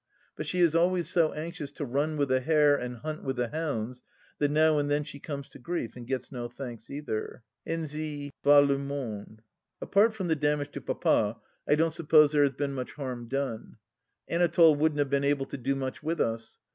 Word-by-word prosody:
But - - -5
she 180 - 0
is 170 -3 +4
always 175 +1 +2
so 165 -3 +3
anxious 155 -2 -5
to 145 - -4
run 145 +5 -1
with 140 -2 +1
the 130 0 +3
hare 150 +1 +4
and 125 -2 -4
hunt 155 +4 -6
with 135 -1 -2
the 120 -1 -1
hounds 130 -6 -3 0.4
that 145 - +2
now 155 0 +4
and 145 0 -1
then 145 +1 +1
she 145 -1 -8
comes 140 -1 -6
to - - -13
grief 125 -4 -4
and 120 -1 -9
gets 130 -1 -3
no 120 -3 -4
thanks 120 -2 -8
either. 140 -5 -5 0.2
Ainsi 155 -3 -4
va 145 0 +8
le 140 -1 +2
tnonde! 125 -7 -5 0.4
Apart 215 +3 +3
from 190 -4 -3
the 160 - +2
damage 145 -1 0
to - - -6
Papa, - - +1 0.3
I - - +5
don't 160 +1 +1
suppose 155 -2 +5
there 150 -1 +3
has 140 -1 +3
been 140 +1 -2
much 130 -2 -5
harm 125 -4 -5
done. 135 -3 -4 0.5
Anatole 170 -1 +5
wouldn't 150 +1 +1
have 145 -2 0
been 140 0 +2
able 140 -1 +1
to - - -7
do 135 +3 0
much 130 -1 -4
with 165 +2 -2
us. 115 0 -2
145 Hz, 210 wpm, -28 LUFS, 130-155 Hz, 0.5 s, va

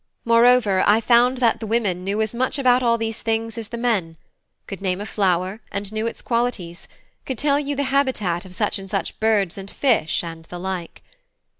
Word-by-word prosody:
Moreover, 230 -4 +4
I 210 +2 +5
found 245 +2 +4
that 235 -3 +2
the 220 - -5
women 205 -5 0
knew 205 +3 0
as 215 - -4
much 255 +3 0
about 255 -2 +3
all 235 -1 +2
these 225 -1 -3
things 225 -1 -1
as 225 -2 -5
the 235 - -6
men: 205 -9 -1 0.5
could 195 -1 -8
name 185 -1 -1
a 205 - -5
flower, 190 0 0
and 200 +1 -4
knew 220 +1 -1
its - - -6
qualities; 230 -8 -2 0.4
could 260 - -4
tell 285 +1 +2
you 285 0 -3
the 285 - 0
habitat 260 -11 0
of 185 -1 -11
such 210 0 -1
and 195 0 -10
such 195 0 -3
birds 205 -4 +1
and 195 0 -7
fish, 225 - +1
and 165 -1 -8
the 175 - -8
like. 180 -1 -5
220 Hz, 200 wpm, -22 LUFS, 190-240 Hz, 0.5 s, I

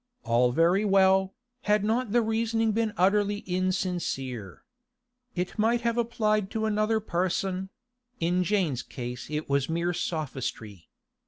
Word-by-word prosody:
All 120 +1 +3
very 170 +8 +3
well, 190 -1 +3 0.3
had 210 -1 +4
not 225 +1 0
the 240 +1 +3
reasoning 225 0 +1
been 220 0 0
utterly 205 +2 +2
insincere. 180 - -2 0.7
It 180 +3 -3
might 230 +2 +2
have 235 -1 0
applied 215 -4 0
to 220 - 0
another 215 +1 +1
person; 185 0 -1 0.5
in 175 +2 +1
Jane's 180 - 0
case 125 -1 -7
it 150 0 -3
was 140 0 +1
mere 170 +2 0
sophistry. 125 - -4
190 Hz, 130 wpm, -27 LUFS, 155-215 Hz, 0.7 s, had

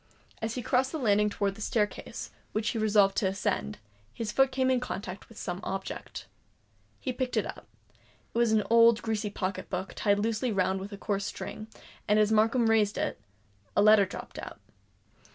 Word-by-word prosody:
As 225 0 -2
he 250 - -3
crossed 260 +2 +1
the 320 - -3
landing 210 -5 +3
towards 200 -1 -1
the - - -10
staircase, 210 -1 -2 0.2
which 215 +1 0
he 230 - -2
resolved 205 -2 +4
to 195 - +2
ascend, 185 - -2 0.3
his 215 - -4
foot 270 +2 +3
came 260 0 +2
in 255 - +3
contact 200 -5 -6
with 225 - -15
some 175 0 -4
object. 195 - -5 0.7
He 255 - -3
picked 255 0 -2
it - - +2
up: - - -8 0.7
it - - -3
was 235 -2 +3
an 215 -1 +3
old 230 0 +5
greasy 220 -2 -1
pocket 195 -1 -4
book, 185 +1 -4
tied 205 -1 +2
loosely 225 +3 0
round 190 -1 +1
with 195 +2 -7
a 200 - -7
coarse 200 -1 -2
string, 215 0 -6 0.4
and 210 0 +4
as 215 0 +4
Markham 225 +2 +3
raised 215 -2 +3
it, - - -2 0.5
a 205 - +5
letter 215 -2 +7
dropped - - -8
out. - - -8
215 Hz, 190 wpm, -29 LUFS, 200-230 Hz, 0.7 s, letter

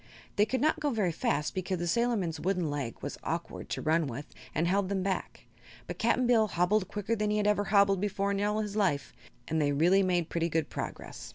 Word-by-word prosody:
They 210 +1 +3
could 255 +2 -1
not 315 +1 +2
go 300 -1 0
very 210 -9 +1
fast 150 -2 -1
because 185 0 -2
the 175 - -3
sailorman's 195 -5 0
wooden 180 -3 0
leg 140 -5 -3
was - - -5
awkward - - -4
to - - -3
run 160 0 +2
with 135 +3 -5 0.3
and 165 +3 +1
held 195 +1 +1
them 195 -2 -1
back, 190 0 -3 0.4
but - - -7
Cap'n 240 +2 +2
Bill 230 -3 +4
hobbled 185 +2 +1
quicker 205 +3 -2
than 210 -1 0
he 210 - +1
had 210 - +1
ever 205 0 +2
hobbled 200 -1 +4
before 200 -1 0
in 200 0 -1
all 210 +1 +1
his 210 -1 -4
life, 180 -10 0 0.3
and 160 0 0
they 145 -1 +2
really 175 +7 +4
made 180 -3 +1
pretty 170 0 0
good 160 -1 -1
progress. - - -6
195 Hz, 220 wpm, -30 LUFS, 165-210 Hz, 0.4 s, Bill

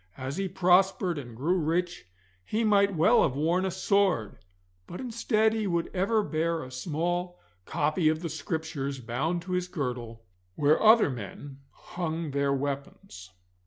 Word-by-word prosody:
As 135 +2 -5
he 195 0 -1
prospered 185 -1 +2
and 120 -4 -10
grew 170 +8 +1
rich 170 - -1 0.4
he 220 - -1
might 200 -2 +3
well 190 +10 +5
have 130 - +1
worn 170 +6 +1
a - - 0
sword, 185 - +1 0.5
but 175 - -8
instead 220 -3 +1
he 220 -2 -1
would 170 -2 -1
ever 205 +4 +1
bear 165 -1 -1
a 130 - -10
small 175 +6 -3 0.3
copy 155 +2 +1
of 155 +1 -1
the - - -1
Scriptures 155 -3 -4
bound 150 +9 -2
to 185 - -8
his 180 0 -1
girdle, 125 -9 -5 0.3
where 150 +2 +3
other 220 -7 +6
men 130 +4 -8
hung 165 -3 -5
their 140 0 +1
weapons. 135 -9 -5
165 Hz, 155 wpm, -28 LUFS, 140-185 Hz, 0.5 s, other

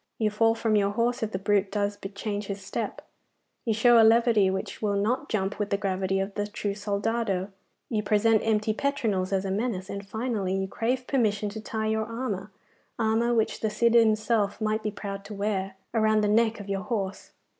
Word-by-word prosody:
'You 215 -2 +1
fall 225 +2 +3
from 225 -1 +1
your 200 -1 +3
horse 235 +4 0
if 220 - -1
the 185 - -2
brute 200 0 +1
does 205 0 0
bit 195 0 -9
change 205 0 -3
his 200 0 -4
step, 195 - -4 0.6
you 225 - +2
show 235 +1 +6
a - - +6
levity 225 -3 +5
which 190 0 -4
will 205 -2 +1
not 235 +9 0
jump 195 -1 -1
with 205 -1 -1
the 200 - +1
gravity 195 -1 -1
of 195 +1 -2
the 205 0 -2
true 205 -1 -3
soldado, 205 -1 -1 0.4
you 215 -3 -1
present 210 +1 +3
empty 215 -1 +1
petronels 215 -8 -1
as 195 0 0
a 190 - -2
menace, 200 -2 -2
and 200 0 -6
finally, 220 -4 -2
you 190 0 -1
crave 250 +5 -1
permission 215 -6 +1
to 215 +1 -7
tie 220 0 -3
your 220 0 0
armour 220 -4 -4 0.5
armour 225 +1 +2
which 220 -1 +1
the 220 - 0
Cid 230 +2 +2
himself 215 -2 +3
might 215 0 0
be 215 - -1
proud 200 -1 -6
to 210 - -7
wear 195 -2 -2 0.2
around 215 -1 +3
the 210 - +2
neck 225 +1 +2
of 205 - -8
your 195 -1 -2
horse. 200 -3 -4
210 Hz, 205 wpm, -27 LUFS, 200-225 Hz, 0.6 s, show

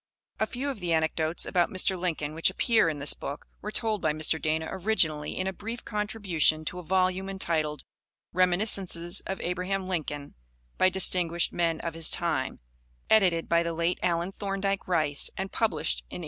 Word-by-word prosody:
A - - +1
few 275 +3 -3
of 260 - -8
the 175 -2 -1
anecdotes 160 +1 +1
about 175 -1 +1
Mr. 190 -1 +4
Lincoln 165 -5 -3
which 165 +1 +3
appear 225 -8 +2
in 155 - -4
this 140 0 +2
book 140 - -7 0.2
were 210 - -5
told 215 -3 +1
by 155 -2 +1
Mr. 155 0 -1
Dana 160 +1 -1
originally 170 -7 0
in 185 - -1
a 190 - -2
brief 225 +4 -7
contribution 200 -7 0
to 180 - -4
a - - -8
volume 185 +2 0
entitled 160 -6 -2 0.5
Reminiscences 180 -1 +3
of 190 - -4
Abraham 185 +2 -2
Lincoln 150 -5 -4 0.5
by 185 - +5
Distinguished 175 -2 +3
Men 165 -2 0
of 170 - -4
his 165 -1 +4
Time, 135 -6 -1 0.5
edited 180 -6 +3
by 170 0 +3
the 170 0 -2
late 170 +2 -1
Allen 170 +1 0
Thorndike 195 0 -3
Rice, 155 -5 +1
and 190 +1 -4
published 225 -2 0
in - - -9
1886. - - -5
175 Hz, 175 wpm, -27 LUFS, 160-195 Hz, 0.5 s, by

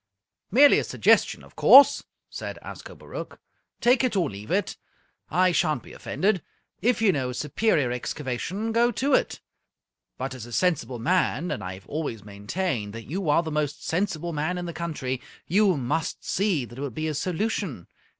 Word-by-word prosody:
"Merely 280 +7 +6
a - - -1
suggestion, - - +2
of - - -18
course," 275 +1 +7 0.2
said - - -6
Ascobaruch. - - -9 0.4
"Take 245 +1 +4
it 250 -4 0
or 175 - +1
leave 100 +2 -9
it. 200 +3 0 0.5
I 185 0 +3
shan't 155 -2 +1
be - - -13
offended. 195 -2 0 0.4
If 235 0 +2
you 205 - +6
know 130 -6 -1
a - - -4
superior 150 - +1
excavation, 150 - -3
go 235 +1 +3
to 275 +2 0
it. - - +1 0.8
But 130 +1 -4
as 125 -3 -8
a 120 - -10
sensible 160 -7 0
man 175 +3 0
and - - -3
I've 95 +1 -7
always 130 -8 -4
maintained 105 - -3
that 115 +3 -9
you 185 -2 -2
are 160 +3 +4
the 160 - -5
most 150 -1 -2
sensible 170 -2 -1
man 155 +4 -1
in 175 - -4
the 170 - -5
country 135 -7 -3 0.2
you 190 -1 +3
must 140 +6 -2
see 185 -9 0
that 120 +2 -12
it - - -5
would 140 -5 -4
be 155 0 -2
a 155 - -1
solution. 180 - -2
160 Hz, 175 wpm, -25 LUFS, 130-190 Hz, 0.8 s, course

